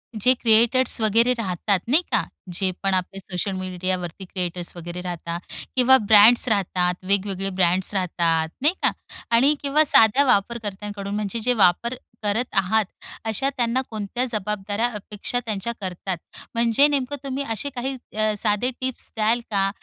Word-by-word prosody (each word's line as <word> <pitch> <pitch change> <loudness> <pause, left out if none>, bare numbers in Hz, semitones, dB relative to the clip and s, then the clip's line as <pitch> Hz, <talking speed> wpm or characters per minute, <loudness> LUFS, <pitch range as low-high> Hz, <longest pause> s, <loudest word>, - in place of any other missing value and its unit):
जे 235 +4 +3
क्रिएटर्स 235 +1 +3
वगैरे 230 +3 +3
राहतात 195 -1 0
नाही 300 +7 +5
का, - - +2 0.3
जे 185 +2 0
पण 195 -1 +1
आपले 185 +1 -2
सोशल 190 +1 -3
मीडियावरती 185 -1 -4
क्रिएटर्स 180 -1 -3
वगैरे 175 +1 -6
राहतात, 170 -1 -5 0.4
किंवा 260 +1 +6
ब्रँड्स 220 +2 +6
राहतात, 180 -3 +1
वेगवेगळे 195 -1 0
ब्रँड्स 185 +1 +1
राहतात 170 -4 0
नाही 305 +5 +4
का? - - +4 0.4
आणि 265 +6 +4
किंवा 285 +2 +3
साध्या 255 +2 +5
वापरकर्त्यांकडून 205 -3 -1
म्हणजे 210 +2 -2
जे 250 +3 +1
वापर 225 +3 +2 0.3
करत 210 +4 +1
आहात, 200 +3 +2 0.4
अशा 245 +5 0
त्यांना 240 +1 +1
कोणत्या 220 +3 -3
जबाबदाऱ्या 210 0 -2
अपेक्षा 210 +3 -4
त्यांच्या 220 +1 -3
करतात? 185 0 -4 0.4
म्हणजे 235 +5 +4
नेमकं 280 -1 -1
तुम्ही 275 +1 -3
असे 225 +6 -3
काही 265 0 -4 0.2
अ, 215 0 +2
साधे 210 +3 +1
टिप्स 260 -1 -3
द्याल 225 +2 +2
का? 195 -1 +2
210 Hz, 145 wpm, -23 LUFS, 190-240 Hz, 0.4 s, किंवा